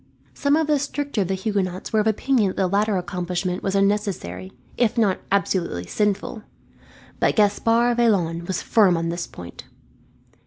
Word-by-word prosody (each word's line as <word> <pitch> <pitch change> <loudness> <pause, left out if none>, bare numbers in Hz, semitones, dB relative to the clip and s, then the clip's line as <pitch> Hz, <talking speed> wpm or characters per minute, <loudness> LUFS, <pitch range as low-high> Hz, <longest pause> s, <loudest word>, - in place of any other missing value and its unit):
Some 285 0 +1
of 320 0 +2
the 295 -1 +2
stricter 285 -4 -2
of 190 - 0
the 190 - -1
Huguenots 190 -2 -3
were 220 - +4
of 210 - +1
opinion 220 0 +2
that - - -7
the 190 - +2
latter 200 +2 +1
accomplishment 180 0 -3
was 195 0 -2
unnecessary, 195 - -1 0.2
if 240 -2 +1
not 205 -5 +2
absolutely 180 - 0
sinful; 210 - -1 0.8
but - - +2
Gaspard 230 +3 +2
Vaillant 175 -8 +1
was 190 - -2
firm 195 -6 +4
on 165 0 -2
this 170 +1 -3
point. 85 -1 -11
200 Hz, 160 wpm, -23 LUFS, 180-220 Hz, 0.8 s, were